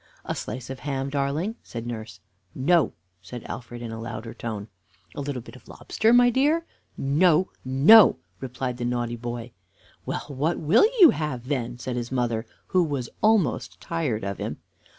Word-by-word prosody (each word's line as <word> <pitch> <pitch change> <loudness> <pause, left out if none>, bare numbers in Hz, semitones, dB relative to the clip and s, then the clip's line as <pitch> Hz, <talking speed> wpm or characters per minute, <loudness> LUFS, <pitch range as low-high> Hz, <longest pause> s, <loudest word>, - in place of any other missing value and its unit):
"A - - -2
slice 130 0 -6
of 130 - -7
ham, 135 -1 -3
darling?" 145 +10 -1
said 115 -1 -7
nurse. 110 -3 -7 0.3
"No," 160 +4 +3 0.3
said 110 +6 -8
Alfred, 120 0 -7
in 115 - -5
a 115 0 -6
louder 115 0 -6
tone. 110 -3 -5 0.5
"A - - -5
little 135 -4 -4
bit 130 - -12
of 130 - -16
lobster, 220 +1 0
my 245 0 +6
dear?" 300 +7 +2 0.3
"No, 160 +6 +3
no," 150 +12 +7 0.2
replied 125 -1 -4
the 120 - -3
naughty 120 -1 -1
boy. 120 0 -6 0.5
"Well, - - -4
what 145 +4 -1
will 170 - +5
you 340 - +10
have, 130 -5 -4
then?" 120 -4 -2
said 125 0 -4
his 120 0 -4
mother, 120 -3 -1 0.2
who 185 -1 +2
was 140 -7 -3
almost 215 -6 +2
tired 150 -11 -2
of 100 0 -4
him. - - -4
130 Hz, 170 wpm, -25 LUFS, 120-160 Hz, 0.5 s, you